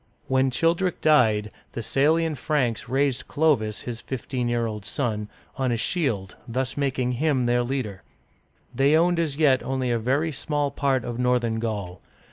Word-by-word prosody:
When 130 0 +2
Childeric 165 +7 +1
died, 110 -9 +3 0.2
the 115 - -4
Salian 160 +6 +2
Franks 130 -5 -1
raised 135 -1 0
Clo'vis, 135 -9 +1
his 120 -2 -6
fifteen 125 -1 -3
year 120 -1 0
old 105 -2 -5
son, 105 -1 -2 0.3
on 130 -2 0
a 120 - +1
shield, 115 - -1
thus 130 +2 -2
making 130 -3 0
him 130 0 +1
their 120 0 +2
leader. 120 -6 -3 0.7
They 140 +3 +4
owned 175 +1 +3
as 155 -4 -1
yet 140 -5 +4
only 130 -2 -1
a 120 - +1
very 140 +8 0
small 145 0 -1
part 135 -3 0
of 120 0 -4
northern 125 -2 +1
Gaul. 100 -6 -4
130 Hz, 160 wpm, -25 LUFS, 115-145 Hz, 0.7 s, They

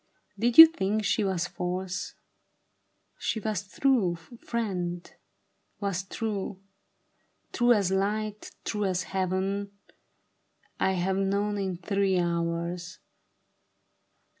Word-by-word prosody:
" - - -27
Did 235 +2 +1
you 325 - +15
think 215 -9 -1
she 215 - +2
was 185 -3 0
false? 180 +2 -4 1.0
She 235 - -1
was 210 -2 -3
true, 225 -7 +2
friend, 180 -2 -4 0.7
was 195 -3 -1
true; 200 -1 -4 0.9
true 240 0 +4
as 200 -4 +1
light, 210 +2 -1 0.2
true 210 -1 -1
as 185 -1 0
Heaven, 190 +2 -2 1.1
I 190 - +2
have 190 +1 0
known 200 +1 0
it 185 -3 -4
three 195 -2 +1
hours. 170 +1 -2
195 Hz, 105 wpm, -28 LUFS, 180-210 Hz, 1.1 s, you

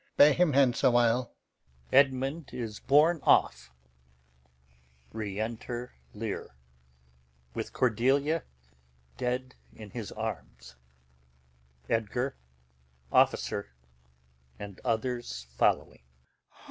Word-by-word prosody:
Bear 145 +1 +8
him 175 -3 +2
hence 130 -2 +3
awhile. 120 -1 +3 0.6
[Edmund 135 +3 +3
is 110 -3 -5
borne 155 +5 +4
off.] - - +3 1.4
Enter 110 +3 -4 0.2
Lear, - - -5 1.0
with - - -4
Cordelia 135 +7 +2 0.7
[dead] 125 +1 -2 0.2
in 105 -2 -11
his 115 -4 -6
arms, 75 - -6 1.1
[Edgar, 115 +4 -1 0.8
Captain, 100 - +2 0.9
and 100 -2 -9
others 115 - -2
following]. - - +1
120 Hz, 75 wpm, -29 LUFS, 110-135 Hz, 1.4 s, Bear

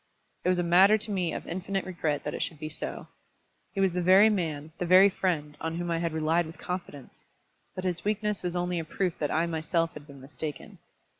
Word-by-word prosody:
It - - +2
was 180 - +3
a 175 - +1
matter 190 +5 +6
to 215 0 -6
me 180 -4 0
of - - -5
infinite 190 +2 -3
regret 160 -5 -2
that 150 - -3
it - - -4
should 160 - -3
be 155 +1 -5
so. 155 - -6 0.6
He 200 - -5
was 190 -2 +3
the 180 - 0
very 190 +5 +6
man, 160 -6 -2
the 180 - -1
very 185 +3 +8
friend, 160 -6 -2
on 160 0 -2
whom 175 0 -3
I 165 - 0
had 170 -1 -1
relied 160 +2 +1
with 160 - -11
confidence! 175 -7 -7 0.5
But 185 - -5
his 180 -2 -2
weakness 210 0 -1
was 180 -1 -3
only 175 0 -1
a - - -3
proof 175 +2 -2
that 150 - 0
I 160 +3 +1
myself 165 0 -1
had 150 -1 -11
been 140 -2 -12
mistaken. 140 +3 -7
175 Hz, 225 wpm, -28 LUFS, 160-185 Hz, 0.6 s, very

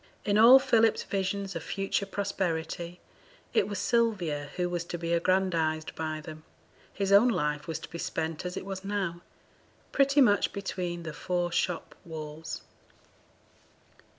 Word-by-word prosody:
In 205 - +2
all 240 +4 +10
Philip's 230 -5 +3
visions 195 0 -2
of - - -3
future 195 0 -2
prosperity, 175 -3 -3 0.5
it - - +3
was 205 -1 -4
Sylvia 185 - 0
who 180 -1 0
was 175 -1 -2
to 175 - -4
be 170 0 -2
aggrandized 170 -3 +1
by 155 -1 -3
them; 155 0 -10 0.5
his 195 -1 -2
own 200 +5 +7
life 150 -9 0
was 165 - -2
to - - -8
be 170 - -8
spent 160 0 -3
as 180 0 -4
it - - -5
was 195 -1 -5
now, 195 -4 -2 0.7
pretty 275 +1 +3
much 205 -7 +4
between 180 -3 -4
the 165 -2 -5
four 175 +1 -1
shop 175 0 -1
walls. 155 -1 -7
180 Hz, 150 wpm, -29 LUFS, 160-200 Hz, 0.7 s, all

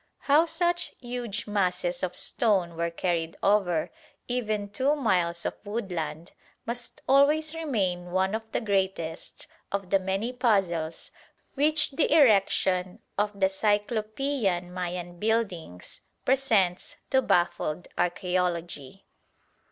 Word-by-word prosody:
How 300 +4 +4
such 345 +1 0
huge 240 -4 -4
masses 180 -4 0
of 180 -1 -2
stone 190 -7 +2
were 170 +1 -1
carried 170 -1 -2
over 195 -5 +2 0.4
even 215 -5 -2
two 265 +8 +1
miles 180 - +1
of - - -2
woodland 175 -7 -4 0.3
must 240 +1 -5
always 300 +3 +4
remain 195 - -1
one 190 +2 +1
of 220 - -1
the - - -1
greatest 190 -6 -2 0.3
of 195 -2 -3
the 195 - +5
many 195 +6 -2
puzzles 185 -10 0 0.4
which 300 +2 +2
the 280 +2 +1
erection 195 - +4 0.2
of 205 0 -1
the 190 - +5
cyclopean 210 -1 0
Mayan 175 -1 -5
buildings 195 - -2 0.2
presents 225 -9 +2 0.2
to 265 - +4
baffled 175 -4 0
archæology. 175 -3 -2
195 Hz, 115 wpm, -27 LUFS, 175-240 Hz, 0.4 s, the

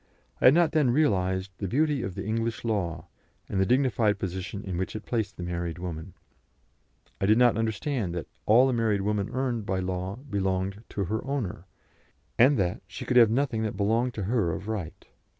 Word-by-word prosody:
I - - +2
had 130 - +8
not 170 -2 +4
then 150 -5 +3
realised 95 -8 +1
the 100 - -2
beauty 145 - +1
of 95 - -4
the 100 - -5
English 115 +2 -2
law, 85 -8 -1 0.4
and 95 - 0
the 95 - +2
dignified 120 -5 +2
position 95 +1 -4
in 95 -2 -4
which 95 +4 -3
it 110 - -6
placed 110 -5 -2
the 90 - -5
married 85 -1 -3
woman; 85 0 -6 1.1
I 95 - +2
did 110 +2 +5
not 120 -2 +5
understand 110 - -1
that 85 - -3 0.2
all 120 +5 +6
a 130 - +1
married 110 -4 +1
woman 105 0 -1
earned 125 -3 -1
by 95 - 0
law 90 +1 -3
belonged 100 -5 -2
to 100 - -2
her 110 +4 -2
owner, 115 -10 -4 0.7
and 135 +4 +6
that 90 -3 0
she - - -7
could 125 - +2
have 115 -3 +8
nothing 120 -1 0
that 110 -1 -2
belonged 115 +4 +1
to 105 - -3
her 100 -5 +1
of 100 - -6
right. 105 -7 -5
105 Hz, 195 wpm, -27 LUFS, 95-120 Hz, 1.1 s, had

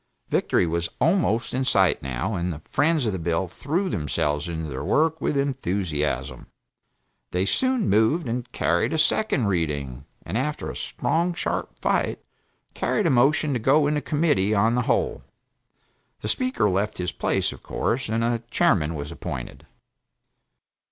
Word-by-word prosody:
Victory - - +2
was 85 0 -1
almost 160 - +2
in 130 +1 0
sight, 95 -7 +3
now, 65 - -3
and 90 -1 -1
the 80 -1 -8
friends 150 -1 +2
of 110 - 0
the 95 - -3
bill 85 +3 0
threw 155 - -2
themselves 75 - -1
into 80 -2 -4
their 65 -3 -5
work 160 +1 +2
with 145 - 0
enthusiasm. 95 - -2 0.8
They 90 +1 0
soon 255 - +1
moved 110 - +3
and 120 +1 -3
carried 85 - +1
its 155 -1 +4
second 155 - +1
reading, 75 -8 -2 0.2
and 100 +8 -2
after 150 +3 -2
a - - -10
strong, 170 +2 -1
sharp - - -3
fight, - - 0 0.5
carried 210 - 0
a 165 - +4
motion 140 +4 +3
to 125 - 0
go 140 +6 +4
into 150 0 +1
Committee 145 - +1
of 110 +3 +3
the 125 - +2
whole. - - +1 1.0
The - - -4
Speaker 255 - +1
left 100 +2 0
his 90 -1 -2
place, - - 0
of - - -11
course, 125 0 -2
and 115 +1 0
a 115 0 0
chairman 80 -7 +2
was 75 +1 -5
appointed. 70 -7 -7
110 Hz, 160 wpm, -24 LUFS, -, 1.0 s, its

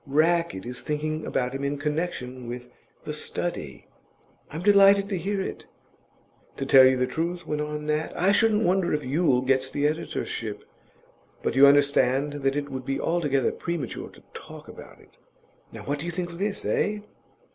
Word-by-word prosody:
Rackett 160 - +1
is 125 0 -6
thinking 155 +1 -3
about 125 0 -1
him 135 +1 -4
in 140 +1 -1
connection 145 -5 -3
with 125 +1 -7 0.4
The - - -4
Study." - - -5 0.6
"I'm 160 +4 -6
delighted 200 0 +6
to 200 - -1
hear 200 +3 -2
it." - - -6 0.9
"To 135 - -3
tell 135 -1 +8
you 130 0 +3
the 125 - +2
truth," 170 +7 -3
went 150 0 -2
on 150 0 -4
Nat, 155 +1 -1
"I 190 +3 +3
shouldn't 220 +1 +3
wonder 185 -3 +2
if 150 - -4
Yule 135 -2 +2
gets 130 0 +1
the 145 +1 -1
editorship; 155 +2 -3 0.8
but - - -1
you 140 +1 +8
understand 140 0 +3
that 135 0 +1
it 145 0 -3
would 130 -1 -5
be 135 +1 -2
altogether 145 -7 +1
premature 170 -8 -5
to - - -18
talk - - -11
about - - -12
it." - - -22 0.5
Now - - -9
what 145 +1 -2
do 165 - -5
you - - -2
think 175 0 -3
of 170 - -10
this, 205 +1 -2
eh? 210 0 0
150 Hz, 180 wpm, -26 LUFS, 135-175 Hz, 0.9 s, tell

